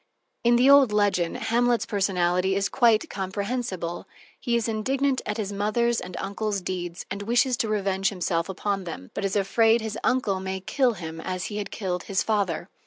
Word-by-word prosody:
In 240 Hz, 0 st, +5 dB
the 245 Hz, +2 st, +4 dB
old 280 Hz, -4 st, +7 dB
legend, 205 Hz, -5 st, +1 dB
Hamlet's 240 Hz, +1 st, +1 dB
personality 190 Hz, -2 st, +1 dB
is 200 Hz, 0 st, 0 dB
quite 230 Hz, -4 st, +3 dB
comprehensible: 195 Hz, -2 st, -4 dB, 0.3 s
he 240 Hz, -2 st, 0 dB
is 235 Hz, -1 st, 0 dB
indignant 260 Hz, +5 st, 0 dB
at 210 Hz, -, -2 dB
his 205 Hz, -2 st, -3 dB
mother's 225 Hz, +4 st, +1 dB
and 180 Hz, 0 st, -8 dB
his -, -, -3 dB
uncle's 200 Hz, +1 st, -2 dB
deeds, 175 Hz, -2 st, -5 dB
and 200 Hz, +1 st, -4 dB
wishes 240 Hz, +4 st, +2 dB
to 220 Hz, -, -1 dB
revenge 195 Hz, -2 st, +1 dB
himself 175 Hz, -2 st, -1 dB
upon 195 Hz, 0 st, -2 dB
them, 90 Hz, -, -8 dB
but -, -, -4 dB
is 195 Hz, 0 st, -1 dB
afraid 225 Hz, +3 st, +3 dB
his 220 Hz, -1 st, -4 dB
uncle 210 Hz, -7 st, +1 dB
may 190 Hz, 0 st, -4 dB
kill 250 Hz, +6 st, +1 dB
him 165 Hz, -4 st, -7 dB
as 185 Hz, +1 st, -3 dB
he -, -, -3 dB
had 205 Hz, -, -4 dB
killed 180 Hz, -3 st, -3 dB
his 195 Hz, -1 st, 0 dB
father. 195 Hz, -6 st, -1 dB
200 Hz, 185 wpm, -25 LUFS, 185-230 Hz, 0.3 s, old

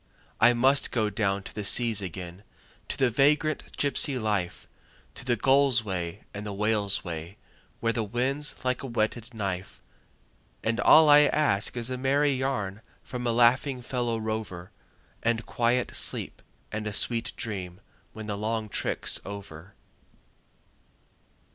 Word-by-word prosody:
I 120 Hz, -, +6 dB
must 130 Hz, +4 st, +3 dB
go 110 Hz, -3 st, 0 dB
down 100 Hz, -1 st, 0 dB
to 110 Hz, -, -10 dB
the 105 Hz, -, -4 dB
seas 115 Hz, 0 st, +2 dB
again, 90 Hz, 0 st, -7 dB, 0.5 s
to -, -, -4 dB
the 130 Hz, -3 st, +2 dB
vagrant 150 Hz, +5 st, +1 dB
gypsy 140 Hz, -1 st, +2 dB
life, 105 Hz, -5 st, -2 dB, 0.5 s
To -, -, -8 dB
the 120 Hz, -1 st, +1 dB
gull's 135 Hz, 0 st, +4 dB
way 95 Hz, -1 st, -4 dB
and 100 Hz, -, -6 dB
the 105 Hz, -, -5 dB
whale's 105 Hz, -1 st, +1 dB
way, 85 Hz, +2 st, -6 dB, 0.4 s
where 115 Hz, 0 st, +1 dB
the 115 Hz, -, -1 dB
wind's 130 Hz, +7 st, -2 dB
like 125 Hz, 0 st, 0 dB
a 135 Hz, -, -5 dB
whetted 115 Hz, 0 st, -2 dB
knife; 95 Hz, -3 st, -4 dB, 0.8 s
And 115 Hz, +1 st, 0 dB
all 160 Hz, 0 st, +7 dB
I 145 Hz, 0 st, +9 dB
ask 125 Hz, -8 st, +1 dB
is 120 Hz, +1 st, -2 dB
a 130 Hz, -, -3 dB
merry 140 Hz, +2 st, +2 dB
yarn 125 Hz, -7 st, -2 dB, 0.2 s
from 125 Hz, -2 st, -4 dB
a -, -, +2 dB
laughing 125 Hz, +2 st, +3 dB
fellow 120 Hz, -2 st, -1 dB
rover, 110 Hz, -5 st, -4 dB, 0.5 s
And 115 Hz, 0 st, 0 dB
quiet 120 Hz, +1 st, 0 dB
sleep -, -, -2 dB, 0.3 s
and 110 Hz, 0 st, -3 dB
a 105 Hz, -, -3 dB
sweet 115 Hz, +2 st, 0 dB
dream 95 Hz, -4 st, -5 dB, 0.3 s
when 110 Hz, 0 st, -8 dB
the 105 Hz, -1 st, -3 dB
long 110 Hz, 0 st, -2 dB
trick's -, -, -1 dB
over. 95 Hz, -2 st, -9 dB
115 Hz, 150 wpm, -27 LUFS, 100-125 Hz, 0.8 s, I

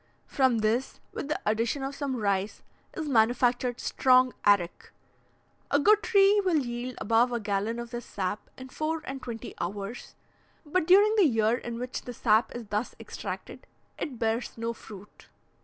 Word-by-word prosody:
From 260 Hz, -4 st, +2 dB
this, 230 Hz, +5 st, 0 dB
with -, -, -5 dB
the 305 Hz, -, -2 dB
addition 230 Hz, +6 st, 0 dB
of 270 Hz, +1 st, -3 dB
some 280 Hz, -2 st, -3 dB
rice, 200 Hz, -2 st, -1 dB, 0.3 s
is 315 Hz, -, -3 dB
manufactured 245 Hz, 0 st, +2 dB
strong 255 Hz, -1 st, +3 dB
arrack. 195 Hz, -4 st, +2 dB, 0.8 s
A 285 Hz, -, +3 dB
good 425 Hz, +7 st, +5 dB
tree 405 Hz, -1 st, +4 dB
will 360 Hz, -4 st, +2 dB
yield 245 Hz, -2 st, -3 dB
above 235 Hz, +2 st, +3 dB
a 240 Hz, -, -1 dB
gallon 210 Hz, +2 st, -1 dB
of 235 Hz, 0 st, -6 dB
this 240 Hz, -1 st, -5 dB
sap 195 Hz, +1 st, -4 dB
in 260 Hz, 0 st, -9 dB
four 310 Hz, +3 st, -3 dB
and 270 Hz, 0 st, -6 dB
twenty 230 Hz, -3 st, -7 dB
hours, 200 Hz, +5 st, -5 dB, 0.5 s
but 315 Hz, +2 st, 0 dB
during 410 Hz, +4 st, +6 dB
the 390 Hz, -6 st, +6 dB
year 225 Hz, -2 st, +2 dB
in 235 Hz, -1 st, -6 dB
which 250 Hz, +1 st, -4 dB
the 245 Hz, -, -8 dB
sap 220 Hz, 0 st, +3 dB
is 240 Hz, -1 st, -6 dB
thus 210 Hz, +4 st, -2 dB
extracted, -, -, -7 dB, 0.3 s
it 265 Hz, -6 st, -4 dB
bears 225 Hz, +1 st, -2 dB
no 230 Hz, +1 st, -2 dB
fruit. 205 Hz, -3 st, -13 dB
240 Hz, 165 wpm, -28 LUFS, 220-275 Hz, 0.8 s, during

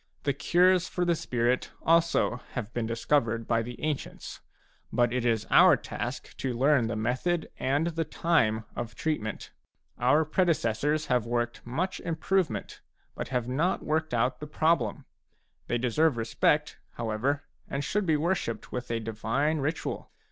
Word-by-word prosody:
The 140 Hz, -, +1 dB
cures 180 Hz, +5 st, +3 dB
for 180 Hz, -, -1 dB
the 175 Hz, -, +3 dB
spirit 125 Hz, -5 st, 0 dB
also 165 Hz, -6 st, +3 dB, 0.2 s
have 120 Hz, -2 st, -4 dB
been 115 Hz, -2 st, -1 dB
discovered 115 Hz, -1 st, 0 dB
by 115 Hz, -1 st, +2 dB
the 120 Hz, +2 st, -7 dB
ancients; 150 Hz, -3 st, -4 dB, 0.5 s
but 120 Hz, -1 st, +2 dB
it 125 Hz, -1 st, 0 dB
is 110 Hz, -2 st, +1 dB
our -, -, +7 dB
task -, -, -6 dB
to 130 Hz, -2 st, -2 dB
learn 135 Hz, -2 st, +3 dB
the 115 Hz, -, -2 dB
method 130 Hz, +10 st, -1 dB
and 140 Hz, +5 st, +1 dB
the 165 Hz, -1 st, -1 dB
time 125 Hz, -9 st, +1 dB
of 115 Hz, -2 st, -5 dB
treatment. 110 Hz, -7 st, -3 dB, 0.5 s
Our 145 Hz, +6 st, +4 dB
pre 180 Hz, +5 st, +2 dB
decessors 150 Hz, 0 st, +1 dB
have 125 Hz, -5 st, +1 dB
worked 120 Hz, 0 st, -2 dB
much 175 Hz, +10 st, -2 dB
improvement, 170 Hz, +1 st, -1 dB, 0.3 s
but -, -, -5 dB
have 125 Hz, -2 st, -1 dB
not 155 Hz, +9 st, 0 dB
worked 155 Hz, -3 st, 0 dB
out 125 Hz, +2 st, +1 dB
the 150 Hz, -, -6 dB
problem. 160 Hz, +3 st, +1 dB, 0.6 s
They 120 Hz, -, +1 dB
deserve 125 Hz, +4 st, +2 dB
respect, 150 Hz, +6 st, +1 dB
however, 120 Hz, +6 st, -1 dB, 0.2 s
and 140 Hz, +1 st, -3 dB
should 200 Hz, +6 st, -1 dB
be 155 Hz, -2 st, +3 dB
worshipped 150 Hz, -, -2 dB
with 125 Hz, 0 st, -4 dB
a 115 Hz, -1 st, 0 dB
divine 115 Hz, +8 st, -1 dB
ritual. 155 Hz, +4 st, -3 dB
135 Hz, 155 wpm, -28 LUFS, 115-160 Hz, 0.6 s, our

